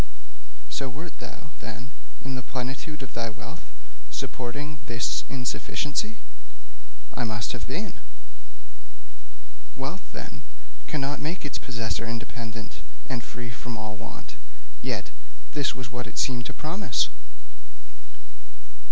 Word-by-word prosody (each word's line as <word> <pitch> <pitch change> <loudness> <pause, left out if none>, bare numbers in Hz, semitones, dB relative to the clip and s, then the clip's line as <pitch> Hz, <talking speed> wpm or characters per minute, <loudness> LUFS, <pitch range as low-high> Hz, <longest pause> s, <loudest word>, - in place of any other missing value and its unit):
'So 100 - +2
wert 155 +6 -3
thou, 145 - -5
then, 115 +5 -3 0.3
in 135 - +2
the 125 - +2
plenitude 135 +4 0
of 130 - -5
thy 115 -1 +3
wealth, 110 - -6 0.4
supporting 145 +4 0
this 120 0 +4
insufficiency?' 145 - +3 1.0
'I 120 - +4
must 110 -1 +2
have - - -1
been.' - - 0 1.8
'Wealth, - - -1
then, - - -4 0.5
cannot 145 0 +3
make 160 +2 +1
its 145 - +1
possessor 115 -3 +2
independent 115 -1 -2 0.3
and 125 -3 +2
free 120 0 -3
from 120 -1 -2
all 110 0 -1
want, 115 +1 -5 0.5
yet - - +2 0.4
this 145 -4 +5
was 130 0 -3
what 120 -1 0
it - - -6
seemed 120 -3 +5
to - - -1
promise. 155 - +4
125 Hz, 115 wpm, -31 LUFS, 115-140 Hz, 1.8 s, this